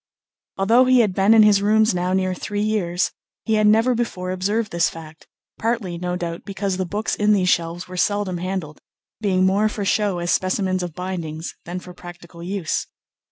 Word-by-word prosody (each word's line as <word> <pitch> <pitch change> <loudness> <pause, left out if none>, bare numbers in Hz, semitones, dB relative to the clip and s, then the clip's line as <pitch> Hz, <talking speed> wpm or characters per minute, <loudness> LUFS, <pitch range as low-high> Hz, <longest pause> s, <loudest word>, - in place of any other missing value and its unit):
Although 225 +6 +4
he 255 -1 +5
had 210 -5 +1
been 195 +4 +4
in 220 - +8
his 205 -2 +5
rooms 215 +1 +3
now 180 0 -1
near 185 0 +1
three 205 +3 -3
years, 185 -5 0 0.3
he 220 - 0
had 215 -1 +3
never 225 +4 +4
before 190 -6 -3
observed 205 +4 -1
this 170 -1 +2
fact; 160 -1 -12 0.3
partly, 220 -7 -2
no 180 0 -2
doubt, 170 -1 -5
because 195 -1 -3
the 185 -1 -2
books 210 +4 -2
in 210 0 +3
these 185 -3 +2
shelves 170 +1 -1
were 180 0 -8
seldom 200 -2 0
handled, 180 -4 -4 0.4
being 190 -3 +2
more 200 +3 +2
for 205 -1 -4
show 205 -2 +1
as 175 0 -1
specimens 185 0 0
of 175 -3 -5
bindings 170 -3 -5
than 175 +2 -5
for 180 0 -12
practical 175 -1 -12
use. 180 -2 -2
185 Hz, 190 wpm, -22 LUFS, 175-210 Hz, 0.4 s, in